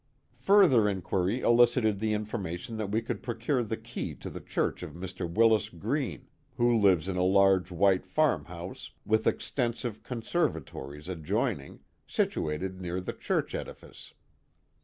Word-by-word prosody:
Further 130 - +5
inquiry 95 +4 -1
elicited 120 -3 +4
the 110 0 0
information 105 -1 -4
that 105 -2 -3
we 110 +3 0
could 115 -2 -4
procure 120 +3 -1
the 110 -1 -3
key 115 +2 -6
to - - -8
the - - -7
church - - -2
of - - -7
Mr. 90 -1 -5
Willis 110 +1 +4
Green, 105 - -3 0.3
who 120 0 +3
lives 95 -6 +4
in 95 -2 -2
a - - +1
large 95 -1 +4
white 95 +1 +2
farm 155 -1 +2
house, 85 +2 -8 0.2
with 110 0 +2
extensive 120 -3 -1
conservatories 85 - -3
adjoining, 80 -5 -2 0.3
situated 90 +5 -1
near 90 0 -3
the 90 - -5
church - - -1
edifice. - - -8
105 Hz, 140 wpm, -29 LUFS, 90-115 Hz, 0.3 s, Further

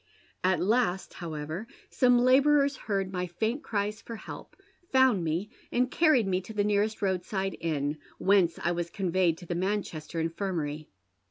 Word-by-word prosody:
At 185 0 +3
last, 205 -2 +1
however, 160 +4 -5 0.2
some 250 -1 +4
labourers 275 +3 +4
heard 195 -5 -2
my 180 0 -2
faint 220 - -2
cries 210 -4 -2
for 230 - -7
help, - - -10 0.4
found 260 -8 +4
me, 170 +7 -2 0.2
and 250 +1 +1
carried 310 -9 +4
me 185 -1 +1
to 205 +4 -10
the 205 - +2
nearest 210 +1 0
roadside 190 +1 -1
inn, 150 -2 -1 0.2
whence 190 -4 +3
I 170 - +2
was 170 -1 -2
conveyed 180 -3 +1
to 175 - -11
the 175 - -3
Manchester 175 -4 -2
Infirmary. 165 -3 -3
190 Hz, 155 wpm, -29 LUFS, 170-220 Hz, 0.4 s, some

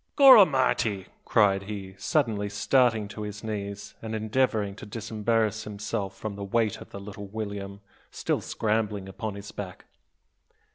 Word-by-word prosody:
"Gorramity!" 135 - +6 0.2
cried 100 -4 +4
he, 95 -3 -6
suddenly 110 -9 +1
starting 110 +1 +2
to 105 - -7
his 105 0 -6
knees, 100 -2 -5
and 110 0 -4
endeavouring 110 -2 +1
to - - -8
disembarrass 110 0 -1
himself 105 -1 -5
of 105 -2 -2
the 100 - -6
weight 110 +1 0
of - - -12
little 100 0 -8
William, 100 -1 -5 0.3
still - - -1
scrambling 105 -3 -1
upon 100 +2 -5
his 100 0 -8
back. 95 -3 -7
105 Hz, 135 wpm, -27 LUFS, 100-110 Hz, 0.3 s, Gorramity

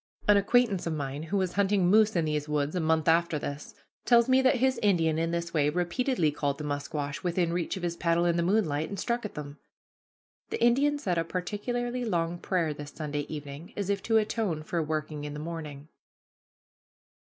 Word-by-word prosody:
An 205 - +7
acquaintance 200 -2 +2
of 165 - -1
mine 140 -1 -4
who 165 +6 -2
was 185 -2 0
hunting 200 -1 +2
moose 215 +2 +4
in 170 -2 +2
these 150 -1 -2
woods 150 +2 0
a - - +1
month 160 -1 +1
after 165 -1 +3
this, 145 0 -6 0.3
tells 235 -1 +5
me 260 0 +5
that 260 +1 +4
his 260 0 +1
Indian 165 -7 +2
in 165 0 0
this 170 0 -3
way 150 -2 +3
repeatedly 175 - 0
called 145 -1 -2
the 150 - -6
musquash 145 0 -3
within 175 -1 0
reach 175 +2 -2
of 185 - -7
his 170 -1 -1
paddle 170 0 +1
in 170 -1 +2
the 170 - +1
moonlight, 170 -5 +1
and 200 - -5
struck 235 -1 -1
at 210 - -7
them. 145 -1 -7 0.9
The - - -3
Indian 275 +5 +3
said 180 - -1
a - - +1
particularly 240 +8 -3
long 170 -5 -1
prayer 170 -5 0
this 145 0 -8
Sunday 145 -1 -4
evening, 145 +1 -8
as 200 -1 -1
if 200 -1 -1
to 225 -1 +2
atone 210 -7 -1
for 170 +2 -1
working 155 -1 -3
in 150 0 -5
the - - -5
morning. 155 -3 -6
170 Hz, 200 wpm, -28 LUFS, 150-205 Hz, 0.9 s, An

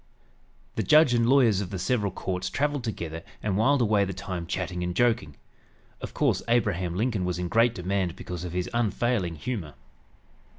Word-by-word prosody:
The - - +2
judge 155 -4 +5
and 115 0 +2
lawyers 120 -8 +4
of 95 - -4
the 95 - -4
several 105 +1 0
courts 95 0 -3
traveled 145 +3 -1
together 85 -8 -4 0.2
and 100 -3 0
whiled 130 +5 +3
away 105 -2 +3
the 95 -2 -4
time 90 -3 -5
chatting 90 0 -3
and 90 0 -3
joking. 115 -12 +1 0.7
Of - - -7
course, - - +2
Abraham 95 -7 +1
Lincoln 110 -1 0
was 90 -1 -1
in 90 0 -2
great 115 +3 +3
demand 90 -1 -1
because 90 -1 -6
of 90 - -5
his 90 0 -1
unfailing 120 -5 0
humor. 80 - -5
100 Hz, 175 wpm, -27 LUFS, 90-120 Hz, 0.7 s, judge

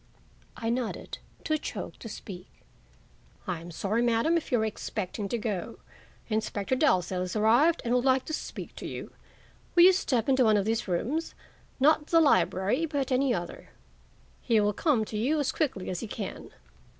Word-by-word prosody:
I 230 0 -1
nodded, 240 -1 -3 0.2
too 310 -1 0
choked - - -6
to 225 - -8
speak. 180 -3 -9 1.0
"I 175 -3 -3
am 170 - -9
sorry, 200 +7 -1
Madam, 240 +7 +2
if 335 - -2
you 245 - +4
were 220 - +1
expecting 210 -1 -4
to 240 - -1
go. 215 0 -3 0.5
Inspector 215 +1 -1
Dalzell 185 - +2
has 180 +2 -3
arrived 240 +11 +4
and 235 - +1
would 250 0 +2
like 260 -1 +3
to 315 - -5
speak - - -6
to - - -6
you. - - -7 0.6
Will 345 - +8
you 375 +1 +8
step 255 - 0
into 265 -1 +4
one 215 -1 +5
of 200 - 0
these 225 0 -1
rooms? 260 - -2 0.4
Not 300 +2 +4
the 330 - +4
library, 270 - +2
but 280 -3 -2
any 260 +1 +2
other. 175 -6 -4 0.7
He 230 -3 +3
will 210 0 +2
come 245 - +1
to 215 - -5
you 290 +8 +1
as 285 - +1
quickly 265 - -2
as 180 - -3
he 230 - -5
can." - - -6
230 Hz, 180 wpm, -28 LUFS, 205-280 Hz, 1.0 s, Will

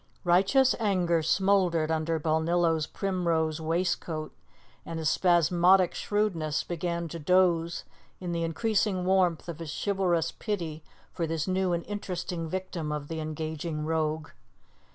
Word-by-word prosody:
Righteous 195 +10 +4
anger 180 -6 +2
smouldered 175 -2 +2
under 160 0 0
Balnillo's 160 0 +1
primrose 170 -5 -1
waistcoat, 165 -1 -2 0.5
and 165 - -6
his 160 -2 +1
spasmodic 175 +1 +4
shrewdness 180 -8 -1
began 170 0 -3
to 170 - -6
doze 170 0 +2 0.4
in 180 -2 -4
the 170 -1 -1
increasing 195 +2 0
warmth 180 -3 +2
of 170 -2 -6
his 165 -2 -6
chivalrous 180 -4 0
pity 165 -7 -4 0.3
for 165 - -2
this 160 0 -2
new 185 0 +1
and 170 -1 -1
interesting 180 -4 -4
victim 180 -4 -4
of 150 -1 -4
the 160 -1 -4
engaging 155 0 -4
rogue. 155 -1 -1
170 Hz, 130 wpm, -28 LUFS, 160-185 Hz, 0.5 s, Righteous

